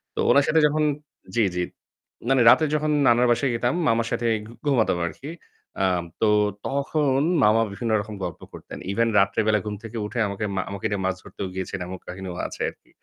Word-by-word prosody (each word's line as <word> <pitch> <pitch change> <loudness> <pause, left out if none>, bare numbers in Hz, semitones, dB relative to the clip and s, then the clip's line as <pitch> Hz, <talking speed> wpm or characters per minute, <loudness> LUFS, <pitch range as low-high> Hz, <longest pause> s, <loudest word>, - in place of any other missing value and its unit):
তো - - -5
উনার 140 0 +5
সাথে 160 - +4
যখন 155 +1 0 0.5
জি, 115 - +3
জি। 90 - 0 0.7
মানে 135 -1 +4
রাতে 155 - +6
যখন 150 0 0 0.2
নানার 120 +1 +4
বাসায় 130 +2 +1
যেতাম 120 +2 0
মামার 115 -1 +2
সাথেই 115 -1 +1 0.3
ঘুমাতাম 120 -10 +2
আরকি। 140 - -8 0.5
আম 90 -2 +1 0.2
তো 110 - +4 0.4
তখন 140 0 0 0.2
মামা 110 +2 +5
বিভিন্ন 115 +3 -3
রকম 105 +1 -8
গল্প 90 - -5
করতেন। - - -9
ইভেন 115 +3 +1
রাত্রে 100 0 +2
বেলা 110 -1 +3
ঘুম 105 -1 -3
থেকে 115 +1 -7
উঠে 120 +4 -4
আমাকে 100 +1 -3
মা 95 - +1
আমাকে 100 +2 -6
নিয়ে 100 -1 -1
মাছ 95 0 0
ধরতেও 95 - -6
গিয়েছেন 95 +1 -4
এমন 95 0 -7
কাহিনীও 90 -1 -6
আছে - - -9
আরকি। - - -20
115 Hz, 190 wpm, -24 LUFS, 100-130 Hz, 0.7 s, রাতে